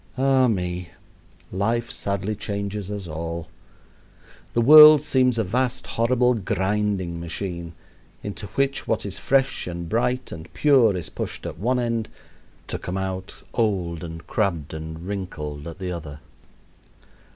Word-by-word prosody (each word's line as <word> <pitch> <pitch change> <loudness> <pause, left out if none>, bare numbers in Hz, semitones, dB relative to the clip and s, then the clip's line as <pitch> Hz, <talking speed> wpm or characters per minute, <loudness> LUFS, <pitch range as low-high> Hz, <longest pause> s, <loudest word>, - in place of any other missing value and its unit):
Ah 135 -1 +4
me! 90 -5 -2 0.6
life 115 +5 0
sadly 100 +1 -2
changes 100 -1 -4
us 100 -3 -5
all. 85 +1 -5 1.1
The 120 - +2
world 150 +3 +10
seems 130 -4 +2
a 110 - +2
vast 125 +5 -1
horrible 125 +2 +2
grinding 95 -4 -1
machine, 85 0 -5 0.5
into 105 0 -5
which 135 0 0
what - - 0
is - - -5
fresh 135 -5 +1
and 85 -1 -5
bright 125 +5 0
and 80 +1 -9
pure 125 -10 +4
is 85 - -5
pushed - - -5
at - - -6
one 125 +6 +1
end, 115 -2 -1 0.6
to - - -4
come 90 +2 -4
out 95 0 -5
old 90 -8 0
and 80 -1 -8
crabbed 85 - -1
and 80 +2 -7
wrinkled 80 -7 -5
at 85 - -8
the 95 -2 -4
other. 75 -4 -7
100 Hz, 140 wpm, -24 LUFS, 85-120 Hz, 1.1 s, world